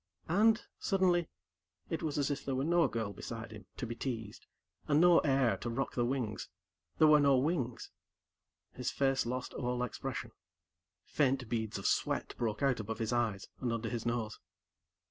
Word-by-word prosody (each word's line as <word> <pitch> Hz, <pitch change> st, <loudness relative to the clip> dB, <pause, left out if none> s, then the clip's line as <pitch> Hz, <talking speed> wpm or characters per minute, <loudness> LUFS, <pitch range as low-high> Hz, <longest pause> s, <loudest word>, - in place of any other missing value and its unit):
And, 215 Hz, +5 st, +4 dB, 0.2 s
suddenly, 180 Hz, -4 st, +2 dB, 0.6 s
it 165 Hz, -, -1 dB
was 150 Hz, -2 st, -2 dB
as 145 Hz, 0 st, +1 dB
if 140 Hz, -, -3 dB
there 135 Hz, -, -2 dB
were 130 Hz, -, 0 dB
no 170 Hz, +2 st, +4 dB
girl 110 Hz, -3 st, -3 dB
beside 115 Hz, +3 st, -7 dB
him, 105 Hz, -4 st, -11 dB
to -, -, -3 dB
be 115 Hz, -, -4 dB
teased, 115 Hz, -4 st, -5 dB, 0.4 s
and 150 Hz, 0 st, +4 dB
no 175 Hz, 0 st, +7 dB
air 135 Hz, -7 st, +2 dB
to 120 Hz, -, -4 dB
rock 130 Hz, +4 st, -2 dB
the 120 Hz, -, +1 dB
wings 120 Hz, -4 st, -2 dB, 0.5 s
there 155 Hz, -, +6 dB
were 150 Hz, 0 st, +7 dB
no 140 Hz, -2 st, +5 dB
wings. 130 Hz, -4 st, -1 dB, 0.8 s
His 125 Hz, -, -2 dB
face 135 Hz, -3 st, +1 dB
lost 125 Hz, +1 st, -3 dB
all 125 Hz, -1 st, -1 dB
expression. 125 Hz, -, -4 dB, 0.7 s
Faint 135 Hz, -4 st, +1 dB
beads 110 Hz, -3 st, -2 dB
of 100 Hz, -, -7 dB
sweat -, -, 0 dB
broke 115 Hz, +2 st, -1 dB
out 135 Hz, -3 st, +2 dB
above 110 Hz, 0 st, -4 dB
his 115 Hz, +1 st, -1 dB
eyes 115 Hz, -5 st, 0 dB
and 125 Hz, -2 st, -1 dB
under 115 Hz, -1 st, -2 dB
his 115 Hz, -1 st, -3 dB
nose. 115 Hz, -2 st, -2 dB
125 Hz, 175 wpm, -33 LUFS, 115-145 Hz, 0.8 s, no